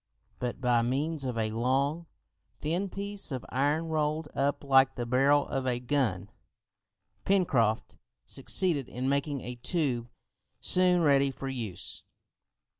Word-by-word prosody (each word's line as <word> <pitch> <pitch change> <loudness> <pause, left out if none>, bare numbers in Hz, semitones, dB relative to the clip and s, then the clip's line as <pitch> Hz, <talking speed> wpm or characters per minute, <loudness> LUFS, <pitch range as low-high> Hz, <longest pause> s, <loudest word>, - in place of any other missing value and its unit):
But 125 0 -3
by 125 -2 +3
means 140 +5 -1
of 125 -3 -3
a 110 -1 0
long, 135 +8 0 0.5
thin 175 +6 -2
piece 200 -1 -2
of 130 -2 -4
iron 145 +5 +1
rolled 155 -1 -1
up 140 +1 0
like 135 -1 +4
the 120 - -3
barrel 140 +4 +3
of 135 -2 -2
a 120 -1 0
gun, 120 -7 -1 0.9
Pencroft 130 - +1 0.3
succeeded 155 - +1
in 125 +2 -3
making 140 0 0
a 125 +1 -6
tube 125 -5 -1 0.5
soon 180 -1 +3
ready 140 -2 +4
for 135 0 -6
use. 115 -8 -4
135 Hz, 130 wpm, -29 LUFS, 125-155 Hz, 0.9 s, like